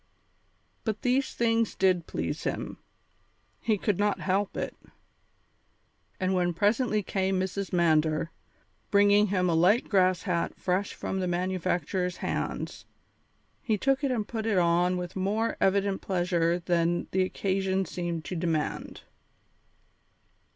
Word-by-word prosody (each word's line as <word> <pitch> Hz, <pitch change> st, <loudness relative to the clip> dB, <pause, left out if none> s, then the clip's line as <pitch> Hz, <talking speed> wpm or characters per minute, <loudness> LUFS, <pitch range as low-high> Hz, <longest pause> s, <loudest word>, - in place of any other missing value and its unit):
But 220 Hz, -2 st, -3 dB
these 260 Hz, +2 st, +1 dB
things 230 Hz, -1 st, +1 dB
did 185 Hz, -3 st, +2 dB
please -, -, -3 dB
him; -, -, -3 dB, 0.8 s
he 220 Hz, -2 st, +1 dB
could 200 Hz, -1 st, -1 dB
not 205 Hz, 0 st, +1 dB
help 195 Hz, +1 st, -1 dB
it. -, -, -3 dB, 1.4 s
And 185 Hz, 0 st, +1 dB
when 175 Hz, -2 st, +1 dB
presently 215 Hz, +3 st, +2 dB
came 190 Hz, 0 st, 0 dB
Mrs. 190 Hz, +1 st, -3 dB
Mander, 160 Hz, -1 st, +2 dB, 0.6 s
bringing 205 Hz, +1 st, +5 dB
him 185 Hz, -2 st, +1 dB
a 170 Hz, -, +2 dB
light 180 Hz, +9 st, +3 dB
grass 185 Hz, -3 st, +3 dB
hat 170 Hz, -2 st, -1 dB
fresh 185 Hz, +2 st, -1 dB
from 190 Hz, -, -3 dB
the 185 Hz, -, -1 dB
manufacturer's 180 Hz, 0 st, -1 dB
hands, -, -, -3 dB, 0.8 s
he 220 Hz, -5 st, 0 dB
took 270 Hz, +6 st, +1 dB
it 275 Hz, -, +2 dB
and 225 Hz, -5 st, -1 dB
put 225 Hz, -1 st, -3 dB
it 210 Hz, -4 st, +2 dB
on 175 Hz, +1 st, +3 dB
with 180 Hz, -1 st, -5 dB
more 205 Hz, +4 st, 0 dB
evident 195 Hz, 0 st, +2 dB
pleasure 175 Hz, -2 st, +1 dB
than 175 Hz, -1 st, 0 dB
the 190 Hz, -, +2 dB
occasion 190 Hz, 0 st, 0 dB
seemed 170 Hz, -2 st, -4 dB
to 185 Hz, -, -4 dB
demand. 160 Hz, -3 st, -2 dB
190 Hz, 130 wpm, -28 LUFS, 175-205 Hz, 1.4 s, bringing